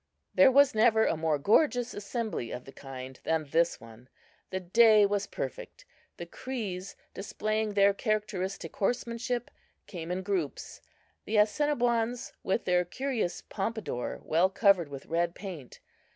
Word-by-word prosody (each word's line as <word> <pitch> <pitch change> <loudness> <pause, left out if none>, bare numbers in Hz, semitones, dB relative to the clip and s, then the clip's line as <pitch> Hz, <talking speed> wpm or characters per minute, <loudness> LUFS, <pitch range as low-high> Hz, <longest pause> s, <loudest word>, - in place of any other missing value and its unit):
There 275 -1 +7
was 280 0 +5
never 220 0 +4
a - - +1
more 160 -1 0
gorgeous 245 - +2
assembly 205 - -4
of 125 - -7
the 135 - -11
kind 130 -1 -9
than 160 -1 0
this 170 +1 +2
one. 115 +2 -15 0.4
The 190 - -2
day 215 +3 +6
was 200 0 -1
perfect. - - -6 0.3
The 175 - -6
Crees, 200 -3 -5 0.2
displaying 215 +1 -2
their 200 0 +5
characteristic 200 -5 -2
horsemanship, 240 +2 -2 0.3
came 170 -3 -7
in 185 +1 -2
groups; 185 -7 -3 0.4
the 215 - 0
Assiniboines, 240 0 +1
with 190 +5 -1
their 180 -1 +3
curious 225 -2 -3
pompadour 205 - -4
well 170 +4 +3
covered 195 -5 +3
with 140 -1 -8
red 170 +1 -1
paint. 175 -10 -8
200 Hz, 135 wpm, -29 LUFS, 170-230 Hz, 0.4 s, There